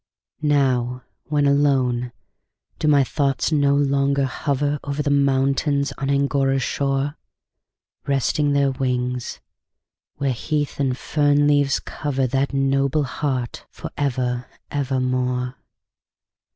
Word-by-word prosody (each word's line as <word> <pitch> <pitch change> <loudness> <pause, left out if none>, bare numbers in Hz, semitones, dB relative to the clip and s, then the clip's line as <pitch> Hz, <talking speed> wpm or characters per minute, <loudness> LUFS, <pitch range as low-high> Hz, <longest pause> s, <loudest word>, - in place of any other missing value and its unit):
Now, 130 -4 +1 0.2
when 145 -1 +1
alone, 130 -4 +2 0.7
do - - 0
my 145 -2 +5
thoughts 140 +2 0
no 140 -2 +3
longer 140 -1 +2
hover 145 +2 -1
Over 145 +1 -2
the 145 - 0
mountains 140 +1 +2
on 135 -1 -2
Angora's 140 -1 +1
shore, 140 +2 -1 0.9
Resting 140 +1 +1
their 140 -1 +3
wings, 125 -1 -2 0.7
where 140 -2 0
heath 145 +4 -2
and 130 -3 0
fern 145 0 +2
leaves 145 -1 +3
cover 135 -3 -2
That 135 +2 0
noble 135 +2 +1
heart 130 -2 -3
for - - -8
ever, 125 -3 -1 0.2
ever 135 -2 -1
more? 125 0 -1
140 Hz, 110 wpm, -22 LUFS, 130-145 Hz, 0.9 s, my